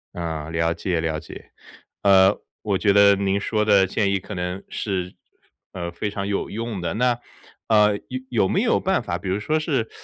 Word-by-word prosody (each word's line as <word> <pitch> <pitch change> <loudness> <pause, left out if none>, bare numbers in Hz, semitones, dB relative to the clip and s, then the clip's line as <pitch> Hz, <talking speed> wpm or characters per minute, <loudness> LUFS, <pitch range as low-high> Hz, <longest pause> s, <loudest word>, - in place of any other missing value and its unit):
嗯， 80 -2 -4
了 80 0 +1
解 90 -2 -2
了 80 -1 -1
解。 - - -12 0.5
呃， 95 0 +6 0.3
我 100 -3 0
觉 100 - +3
得 100 0 +6
您 100 0 0
说 105 +1 0
的 100 -3 +4
建 100 +1 0
议 100 - +1
可 100 - -9
能 90 +2 -4
是， 90 -3 -3 0.6
呃， 85 -2 -4
非 105 +4 -3
常 100 -1 -4
有 100 -1 -2
用 115 -3 -4
的。 85 - -2
那， 120 +1 +1 0.5
呃， 105 -2 +4
有 130 - -3
有 110 -6 +2
没 - - +1
有 - - +2
办 - - +1
法， - - -2
比 95 - -6
如 95 +2 0
说 155 +9 0
是， 135 -8 -1
100 Hz, 210 characters per minute, -23 LUFS, 90-105 Hz, 0.6 s, 呃